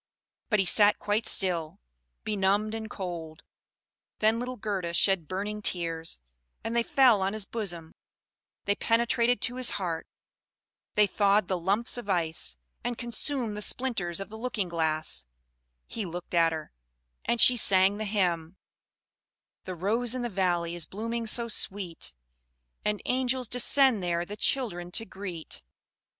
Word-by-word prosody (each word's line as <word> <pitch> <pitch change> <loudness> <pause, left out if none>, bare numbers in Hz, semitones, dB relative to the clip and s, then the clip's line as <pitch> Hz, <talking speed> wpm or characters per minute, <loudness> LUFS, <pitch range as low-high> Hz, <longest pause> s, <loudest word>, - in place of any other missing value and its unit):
But 215 - +3
he 195 - +2
sat 205 +3 +5
quite 210 +2 0
still, 170 -5 +1 0.4
benumbed 205 +1 +1
and 220 -1 -5
cold. 170 -5 -6 0.7
Then 220 +2 +3
little 250 +1 -4
Gerda 190 -5 -3
shed 190 -4 +3
burning 205 +4 -3
tears; 165 -4 -1 0.5
and 225 +1 -3
they 235 - +4
fell 240 -4 +4
on 190 +1 0
his 215 -2 -4
bosom, 175 -8 -5 0.7
they 200 - +3
penetrated 235 +2 +2
to 245 0 -1
his 255 -1 +2
heart, 170 -5 -3 0.9
they 210 -1 +6
thawed 200 -1 +2
the 185 -2 -1
lumps 200 +8 0
of 210 - -9
ice, 160 - -1 0.3
and 245 -1 -2
consumed 240 -1 -2
the 210 - -5
splinters 205 -8 -1
of 195 - -6
the 220 +1 -9
looking 220 -6 -2
glass; 155 - -1 0.6
he 225 - -4
looked 175 -1 -7
at 165 -1 +4
her, 155 -1 -6 0.5
and 235 - 0
she 250 - +7
sang 195 -3 +4
the 215 - -3
hymn: 180 -4 0 1.1
"The 185 - -5
rose 225 +7 +1
in 250 - -2
the 240 - -1
valley 175 -4 0
is 170 -2 -1
blooming 230 +3 -4
so 235 +2 +2
sweet, 190 - +1 0.7
And 210 -1 -1
angels 255 0 +1
descend 250 -1 +4
there 175 -1 -1
the 205 - -7
children 210 -9 0
to 225 - +1
greet." 185 - -6
200 Hz, 150 wpm, -28 LUFS, 175-230 Hz, 1.1 s, she